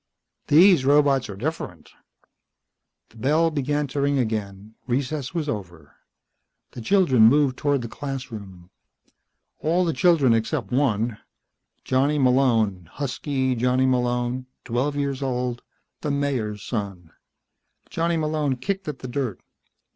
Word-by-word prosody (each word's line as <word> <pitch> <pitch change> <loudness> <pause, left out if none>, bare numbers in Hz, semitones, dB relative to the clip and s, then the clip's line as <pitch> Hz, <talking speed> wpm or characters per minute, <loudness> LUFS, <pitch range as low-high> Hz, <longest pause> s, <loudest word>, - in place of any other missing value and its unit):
"These 175 -1 +6
robots 140 -2 +3
are 100 - -6
different." 100 - -5 1.2
The 115 - -20
bell 155 +7 +2
began 145 0 -1
to 140 +2 -2
ring 140 0 +1
again. 105 -3 -3
Recess 135 +3 -2
was 160 -3 -1
over. 90 - -6 0.8
The 120 - -8
children 130 - +4
moved 140 +1 +3
toward 145 -3 0
the - - -4
classroom. 110 -10 -7 0.9
All 175 +4 +1
the 165 - 0
children 160 -10 +4
except 115 +4 -1
one 115 -4 0 0.6
Johnny 135 +3 +1
Malone, 115 - +2
husky 135 -1 -2
Johnny 125 +2 +1
Malone, 125 0 0 0.2
twelve 130 +4 -1
years 140 -1 -2
old 125 -2 -2 0.4
the 150 - -2
Mayor's 130 -8 -2
son. 100 -7 -5 0.8
Johnny 165 0 -1
Malone 150 -3 0
kicked 190 +8 -4
at 150 -3 -4
the - - -4
dirt. 125 -5 -3
130 Hz, 125 wpm, -24 LUFS, 115-145 Hz, 1.2 s, These